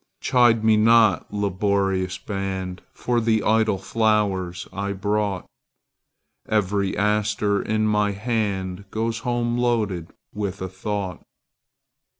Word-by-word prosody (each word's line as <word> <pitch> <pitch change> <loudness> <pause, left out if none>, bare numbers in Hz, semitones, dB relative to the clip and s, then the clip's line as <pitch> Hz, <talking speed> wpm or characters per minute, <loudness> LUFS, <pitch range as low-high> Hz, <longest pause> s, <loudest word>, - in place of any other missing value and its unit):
Chide 120 -4 +3
me 110 -1 +4
not, 110 -3 +4
laborious 95 -2 0
band, 95 -2 -4
For 120 -1 -1
the 110 -1 +1
idle 110 -2 +2
flowers 95 -4 0
I 100 +1 -2
brought; 100 -1 -1 1.0
Every 100 -2 0
aster 105 0 +1
in 110 0 0
my 105 -1 +2
handGoes 105 0 -2
home 120 0 -1
loaded 105 -9 0 0.2
with 100 -2 -4
a 95 - -4
thought. 95 -1 -4
105 Hz, 105 wpm, -23 LUFS, 95-110 Hz, 1.0 s, me